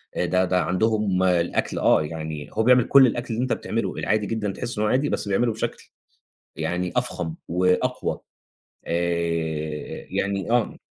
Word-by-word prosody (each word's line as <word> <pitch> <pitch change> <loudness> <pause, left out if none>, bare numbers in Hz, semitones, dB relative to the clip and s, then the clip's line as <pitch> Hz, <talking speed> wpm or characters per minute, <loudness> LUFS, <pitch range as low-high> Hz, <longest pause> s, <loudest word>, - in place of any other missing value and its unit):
آآ، - - 0
ده 90 +1 +2
ده 90 0 +1
عندهم 100 0 +1
الأكل 85 -2 +1
آه، - - +4
يعني 80 -1 -6
هو 110 - +1
بيعمل 125 0 +5
كل 135 -2 +7
الأكل 120 0 -3
اللي 115 +3 -1
أنت 130 - 0
بتعمله، 110 -4 -2
العادي 105 +1 0
جدًا، 105 -2 -2
تحس 120 +3 -5
إنه 105 0 +1
هو - - +1
عادي 140 +3 +2
بس - - -1
بيعمله 115 +4 +2
بشكل 110 - -4 0.7
يعني 90 0 -2
أفخم 80 -1 0
وأقوى، 90 +9 0 0.7
آآ، 85 -3 -2
يعني 100 +1 -2
آه. 120 -2 +1
95 Hz, 160 wpm, -24 LUFS, 85-115 Hz, 0.7 s, كل